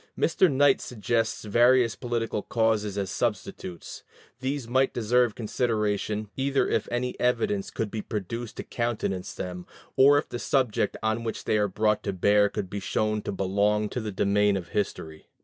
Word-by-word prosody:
Mr. 170 +1 +3
Knight 140 0 +4
suggests 115 -1 -1
various 120 +2 +4
political 115 -4 -2
causes 110 -3 0
as 95 -2 -2
substitutes; 95 -5 -4 0.4
these 130 -1 -3
might 130 +2 +1
deserve 120 0 +2
consideration, 105 -2 -1
either 135 +1 +1
if - - 0
any 125 +1 -1
evidence 115 -5 0
could 110 -2 -3
be 110 - -3
produced 110 +3 -5
to - - -4
countenance 115 -6 -3
them, 90 -1 -6 0.3
or 140 +2 +7
if - - -1
the 120 - -5
subject 130 -6 0
on 110 +1 0
which 115 - -4
they 110 - +1
are 105 - +2
brought 105 +2 +1
to 100 - -3
bear 100 +2 +3
could 100 - -4
be 100 +2 -5
shown 110 +2 -1
to - - -4
belong 100 +2 +1
to 125 - -3
the 110 -1 -4
domain 100 +1 +2
of 90 -2 -7
history. 80 -6 -4
110 Hz, 165 wpm, -27 LUFS, 100-120 Hz, 0.4 s, or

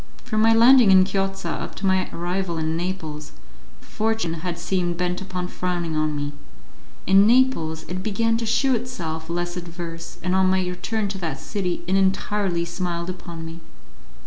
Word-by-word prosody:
From 215 0 0
my 225 +1 +6
landing 235 0 +7
in 190 -1 +8
Chiozza 195 0 -2
up - - -6
to 195 - -4
my 190 -1 +2
arrival 175 0 -2
in 160 0 -1
Naples, 165 -4 -4 0.5
fortune 220 -6 -1
had 175 -1 -3
seemed 175 -2 -1
bent 180 +1 -1
upon 185 -2 -4
frowning 175 -3 -2
on 155 -1 0
me; 145 0 -3 0.7
in 195 +2 +6
Naples 220 -11 +2
it 180 +1 -4
began 225 +3 +1
to 230 - -3
shew 265 +4 +3
itself 170 -10 -4
less 175 +1 -2
adverse, 170 -1 -7
and 185 0 0
on 190 0 +4
my 185 -1 +1
return 200 +4 -2
to 195 -1 -5
that 160 -6 -3
city 185 -5 -3
it 185 +2 +1
entirely 190 -2 +1
smiled 170 0 -3
upon 170 -2 -8
me. 165 +1 -8
180 Hz, 170 wpm, -23 LUFS, 170-195 Hz, 0.7 s, in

